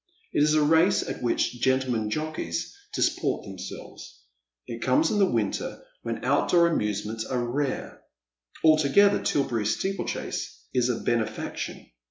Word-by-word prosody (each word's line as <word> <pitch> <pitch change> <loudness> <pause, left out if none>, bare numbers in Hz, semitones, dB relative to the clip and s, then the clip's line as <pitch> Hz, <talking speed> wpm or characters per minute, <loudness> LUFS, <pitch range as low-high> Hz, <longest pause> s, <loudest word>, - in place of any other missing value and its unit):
It - - +2
is 150 +1 +4
a 155 - +4
race 160 +5 +4
at - - -5
which 120 0 0
gentlemen 130 -5 +1
jockeys 155 - -3 0.2
disport - - 0
them 95 -2 -9
selves. - - -9 0.5
It 115 0 -7
comes 310 +3 +3
in 210 - +1
the 195 -2 +4
winter, - - -2 0.2
when - - -4
outdoor 170 -1 +4
amusements 105 -4 -1
are 125 0 -2
rare. 135 +2 -3 0.6
Altogether 155 +6 +5
Tilberry 120 -7 0
steeplechase 195 - -3
is 125 -1 +2
a 120 - -1
benefaction. 115 - -3
130 Hz, 135 wpm, -26 LUFS, 110-155 Hz, 0.6 s, Altogether